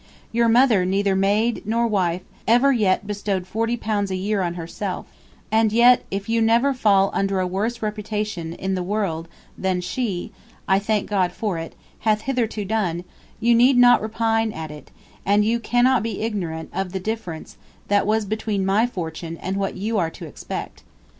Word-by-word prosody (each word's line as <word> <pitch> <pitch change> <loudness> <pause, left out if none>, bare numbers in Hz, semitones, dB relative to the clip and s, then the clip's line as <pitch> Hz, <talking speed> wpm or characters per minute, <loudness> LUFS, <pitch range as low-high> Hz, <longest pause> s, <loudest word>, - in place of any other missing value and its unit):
Yr 235 0 +3
Mother 230 -5 +5
neither 195 +1 +1
Maide 205 +5 +1
nor 230 +3 +1
wife 185 -5 0 0.2
ever 245 +5 +5
yett 205 -5 +2
bestowed 200 -2 -2
forty 230 +5 -1
pounds 210 -3 -1
a 190 - -2
yeare 200 +2 -1
on 175 -1 -2
herself 180 +3 -5 0.4
& - - -14 0.2
yett 240 +3 +5
if 195 +1 -4
you 230 0 +1
never 235 +5 +3
fall 200 -6 +3
undr 195 -1 0
a 185 - +1
worse 215 +6 -2
reputation 210 -5 -3
in 190 +2 -2
ye 185 - -2
world 180 -4 -2 0.3
thn 185 -1 0
she 195 -1 -3 0.4
(I 190 0 +4
thank 210 0 -1
God 190 -4 +1
for 190 -2 -3
it) 165 - -7 0.2
hath 215 -1 +1
hitherto 230 -5 -1
done, 185 -5 -1 0.4
you 235 +1 +3
need 245 +3 +5
not 245 0 +6
repine 225 0 0
at 160 -1 -6
it, 150 -1 -11 0.3
& - - -31
you 210 +3 +3
cannot 245 +1 +3
be 220 -3 -4
ignorant 175 -8 -3
of 190 -2 -2
ye - - 0
difference 185 -5 -5 0.3
tht 205 0 +2
was 215 0 +1
between 210 -1 -2
my 205 +5 +3
fortune 165 -5 -5
& 190 - -1
what 195 -1 -2
you 210 +3 -1
are 165 -3 +1
to - - -10
expect. - - -7
205 Hz, 180 wpm, -22 LUFS, 185-225 Hz, 0.4 s, not